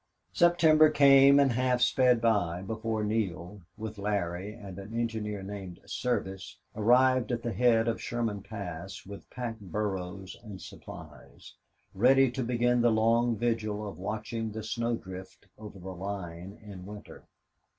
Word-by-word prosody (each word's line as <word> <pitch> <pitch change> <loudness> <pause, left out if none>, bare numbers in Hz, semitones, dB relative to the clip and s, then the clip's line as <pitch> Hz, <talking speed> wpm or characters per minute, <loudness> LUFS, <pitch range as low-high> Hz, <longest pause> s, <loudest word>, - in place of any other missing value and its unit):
September 160 -3 +5
came 140 0 +7
and 140 -2 +4
half 125 +1 +1
sped 125 -1 +4
by 100 -6 +1
before 110 +1 -2
Neale, 100 -3 -2 0.2
with 110 -1 -6
Larry 100 -2 -2
and 100 -4 -10
an 110 +4 -5
engineer 105 -4 -3
named 95 -3 -7
Service, 95 -6 -3 0.2
arrived 125 +2 +4
at 115 -1 -2
the 120 - -2
head 120 -2 +3
of 115 - -1
Sherman 115 -4 -2
Pass 95 -1 -7
with 100 0 -10
pack 120 -3 -5
burros 95 -1 -4
and 105 -4 -9
supplies, - - -12 0.4
ready 130 +5 +5
to 130 +1 -3
begin 120 0 +2
the 120 - +4
long 115 +2 +3
vigil 110 -2 -1
of 100 - -8
watching 110 +3 -4
the 110 +1 -6
snow 115 +2 -1
drift 95 -2 -10
over 105 -2 -10
the 95 +1 -8
line 95 0 -6
in 100 -3 -9
winter. 105 0 -11
110 Hz, 145 wpm, -29 LUFS, 100-120 Hz, 0.4 s, came